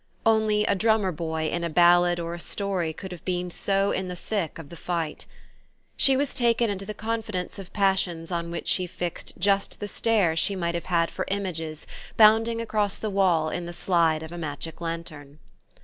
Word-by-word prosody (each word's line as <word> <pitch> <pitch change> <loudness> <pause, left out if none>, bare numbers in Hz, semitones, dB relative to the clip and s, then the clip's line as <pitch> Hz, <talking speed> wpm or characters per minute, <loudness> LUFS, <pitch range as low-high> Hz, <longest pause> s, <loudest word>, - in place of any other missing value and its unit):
Only 220 -1 +3
a - - +3
drummer 215 -1 +2
boy 160 -1 -2
in 170 +2 -2
a 170 - -1
ballad 175 +1 +5
or 170 0 -3
a 175 - -6
story 185 -3 -2
could 185 +4 -8
have 180 - -9
been 180 -1 -2
so 195 +2 +1
in 190 - -2
the 180 - -5
thick 185 -3 -3
of 160 -4 -10
the 170 - -9
fight. 165 -2 -3 0.7
She 270 -1 +4
was 285 0 0
taken 235 -2 +2
into 195 0 -5
the 215 - -5
confidence 215 -4 -3
of 195 -2 -9
passions 190 -4 0
on 170 -1 -2
which 170 - -5
she 185 -1 +2
fixed 175 0 -5
just 195 +2 +1
the 205 - -4
stare 205 -6 +2
she 195 +4 +1
might 170 -2 -1
have 170 - -3
had 170 -2 +1
for - - -3
images 165 -6 -3 0.3
bounding 225 +1 +6
across 215 -3 0
the 215 - -3
wall 180 -5 +3
in 175 -1 -4
the 175 - -6
slide 165 -3 +2
of 160 - -8
a 175 - -6
magic 160 +1 -6
lantern. 165 -4 -6
180 Hz, 195 wpm, -26 LUFS, 170-205 Hz, 0.7 s, bounding